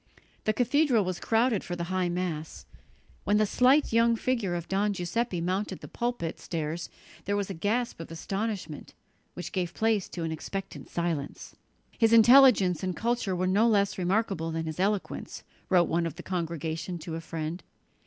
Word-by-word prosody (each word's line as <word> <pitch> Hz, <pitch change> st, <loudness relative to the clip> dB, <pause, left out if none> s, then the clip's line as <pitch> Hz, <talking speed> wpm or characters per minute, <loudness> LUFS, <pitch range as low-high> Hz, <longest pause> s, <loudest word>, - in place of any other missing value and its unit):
The 215 Hz, -, +3 dB
cathedral 245 Hz, -1 st, +2 dB
was 180 Hz, -1 st, -3 dB
crowded 225 Hz, -2 st, +1 dB
for 175 Hz, -, -4 dB
the 170 Hz, -, -3 dB
high 185 Hz, -1 st, +1 dB
Mass. 175 Hz, -3 st, -4 dB, 0.6 s
When 205 Hz, -, +2 dB
the 215 Hz, -, +4 dB
slight 255 Hz, +6 st, +3 dB
young 230 Hz, 0 st, +4 dB
figure 225 Hz, -7 st, -1 dB
of 170 Hz, -1 st, -4 dB
Don 200 Hz, +2 st, +1 dB
Giuseppe 185 Hz, +1 st, -2 dB
mounted 185 Hz, +4 st, -2 dB
the -, -, -8 dB
pulpit 240 Hz, -9 st, -3 dB
stairs 165 Hz, 0 st, -4 dB, 0.4 s
there 205 Hz, +1 st, 0 dB
was 200 Hz, -1 st, -2 dB
a -, -, -3 dB
gasp 215 Hz, +7 st, -1 dB
of 165 Hz, -, -7 dB
astonishment, 195 Hz, -1 st, -4 dB, 0.4 s
which 175 Hz, -, -6 dB
gave 175 Hz, -3 st, -2 dB
place 220 Hz, -3 st, +1 dB
to 170 Hz, -, -5 dB
an 165 Hz, -, -2 dB
expectant 195 Hz, +5 st, -6 dB
silence. 165 Hz, -5 st, -3 dB, 0.4 s
"His 225 Hz, 0 st, +4 dB
intelligence 230 Hz, -, +7 dB
and 185 Hz, -2 st, -2 dB
culture 230 Hz, -5 st, -1 dB
were 180 Hz, +1 st, 0 dB
no 200 Hz, +5 st, +3 dB
less 200 Hz, -4 st, +2 dB
remarkable 185 Hz, -2 st, 0 dB
than 160 Hz, 0 st, -3 dB
his 160 Hz, +1 st, -5 dB
eloquence," 200 Hz, +1 st, -2 dB, 0.3 s
wrote 175 Hz, -3 st, +4 dB
one 170 Hz, 0 st, 0 dB
of 165 Hz, -, -7 dB
the 175 Hz, -, -9 dB
congregation 165 Hz, -1 st, -3 dB
to 165 Hz, 0 st, -7 dB
a 165 Hz, -, -4 dB
friend. 165 Hz, +1 st, -5 dB
185 Hz, 175 wpm, -28 LUFS, 170-220 Hz, 0.6 s, intelligence